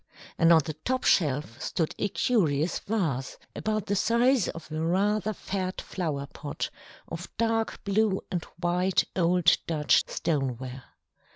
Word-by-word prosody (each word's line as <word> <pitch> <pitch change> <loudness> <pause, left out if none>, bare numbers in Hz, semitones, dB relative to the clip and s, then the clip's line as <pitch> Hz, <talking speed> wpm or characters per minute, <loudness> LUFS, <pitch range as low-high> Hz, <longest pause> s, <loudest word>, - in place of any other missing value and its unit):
And 165 0 +6
on 165 -1 +7
the 155 - -3
top 255 - -2
shelf 145 - +1
stood 160 -3 -1
a 205 - 0
curious 170 - +1
vase, 160 - -2 0.2
about 215 -1 -1
the 200 - 0
size 235 +3 +3
of 165 -1 -7
a 155 0 -2
rather 205 +5 +1
fat 185 -2 -3
flower 150 -7 -3
pot, 145 +1 -5 0.4
of 170 +2 -6
dark 225 0 0
blue 200 -1 +1
and 175 -4 -1 0.2
white 180 +2 +2
old 175 -1 +4
Dutch 150 -3 +3
stoneware. 130 -4 -2
175 Hz, 135 wpm, -28 LUFS, 155-205 Hz, 0.4 s, on